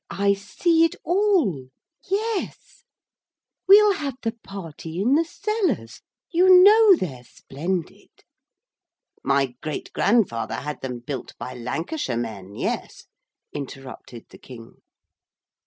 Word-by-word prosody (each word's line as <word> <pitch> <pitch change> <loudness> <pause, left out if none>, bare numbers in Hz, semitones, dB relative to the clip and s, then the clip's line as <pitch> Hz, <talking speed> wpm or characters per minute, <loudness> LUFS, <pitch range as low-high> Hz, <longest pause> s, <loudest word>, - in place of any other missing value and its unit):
'I 200 0 +1
see 325 - +1
it 330 - +1
all 345 - +1 0.4
yes 425 +1 -3 0.8
we'll 410 +1 +7
have 285 -7 -4
the 225 - 0
party 165 -3 -8
in 235 +7 +2
the 320 +3 +4
cellars 335 - -2 0.3
you 365 +1 +7
know 425 0 +7
they're 135 - -5
splendid.' 165 +8 -5 1.1
'My 135 -1 +1
great 155 -2 -6
grandfather 200 - +1
had 150 0 -6
them 125 -2 -5
built 135 +1 -7
by 125 - -7
Lancashire 130 - -4
men, 105 -4 -6
yes,' - - -4 0.5
interrupted 135 -4 -9
the - - -14
King. 115 -3 -13
190 Hz, 110 wpm, -23 LUFS, -, 1.1 s, we'll